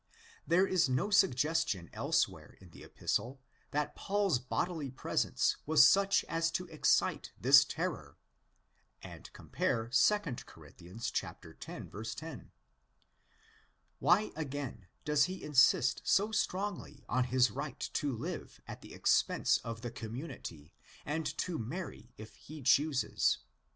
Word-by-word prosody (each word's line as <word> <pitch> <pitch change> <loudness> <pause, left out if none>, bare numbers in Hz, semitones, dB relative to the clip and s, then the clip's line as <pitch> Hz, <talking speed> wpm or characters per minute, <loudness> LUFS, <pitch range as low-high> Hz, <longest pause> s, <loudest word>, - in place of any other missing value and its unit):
There 175 +3 +4
is 185 -7 +2
no 130 +12 0
suggestion 145 - +2
elsewhere - - -1
in 90 -3 -16
the - - -13
Epistle 130 +3 -3 0.3
that 150 0 -2
Paul's 200 -8 0
bodily 145 +4 -3
presence 130 - 0
was 160 0 +7
such 200 0 +3
as 165 +1 -1
to 180 - -2
excite 155 -2 +1
this - - +7
terror; - - -4 0.9
and - - -11
compare 115 0 -2
2 210 +11 +4 0.3
Cor. - - -15
x. 95 +7 -7
10. 115 +8 -7 1.5
Why, 200 +5 +3
again, 140 - -5 0.2
does 150 -1 +3
he 185 +1 -6
insist 145 -1 +4
so 205 +3 +2
strongly 195 -8 -3
on 125 0 +1
his 125 -2 +3
right - - -6
to 145 - -1
live 115 - -6
at - - -8
the - - -11
expense - - +2
of 115 -1 -7
the 120 - -5
community 110 - -8 0.3
and 160 +2 -2
to 180 -3 -2
marry 120 -1 -6
if 110 +1 -11
he 155 -1 -11
chooses? 140 +1 +2
145 Hz, 125 wpm, -32 LUFS, 120-175 Hz, 1.5 s, was